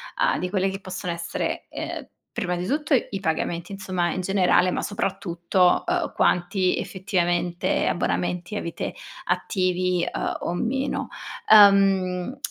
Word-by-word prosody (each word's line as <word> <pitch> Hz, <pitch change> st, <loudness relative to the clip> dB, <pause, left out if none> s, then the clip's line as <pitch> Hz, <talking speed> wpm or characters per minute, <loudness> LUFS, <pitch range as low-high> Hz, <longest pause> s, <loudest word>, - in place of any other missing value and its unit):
a -, -, +2 dB
di 180 Hz, -, -3 dB
quelle 195 Hz, 0 st, +1 dB
che 195 Hz, +1 st, -6 dB
possono 180 Hz, -2 st, -4 dB
essere, 170 Hz, 0 st, -3 dB
ehm, -, -, -6 dB, 0.3 s
prima 180 Hz, -1 st, -2 dB
di 175 Hz, -, -3 dB
tutto 300 Hz, +4 st, 0 dB
i 210 Hz, -6 st, +1 dB
pagamenti, 170 Hz, +1 st, -2 dB
insomma, 185 Hz, -3 st, -2 dB
in 185 Hz, -, -2 dB
generale, 185 Hz, -1 st, +3 dB
ma -, -, -1 dB
soprattutto, 185 Hz, -2 st, +1 dB
uhm, 350 Hz, -2 st, 0 dB
quanti 180 Hz, +1 st, +1 dB
effettivamente 175 Hz, -2 st, -1 dB
abbonamenti 175 Hz, +2 st, -1 dB
avete 170 Hz, -, -4 dB, 0.3 s
attivi, 180 Hz, -2 st, 0 dB
uhm, -, -, -2 dB
o 170 Hz, -, -2 dB
meno. 265 Hz, +9 st, -1 dB, 0.4 s
Uhm, 195 Hz, +1 st, +5 dB
185 Hz, 130 wpm, -24 LUFS, 175-200 Hz, 0.4 s, Uhm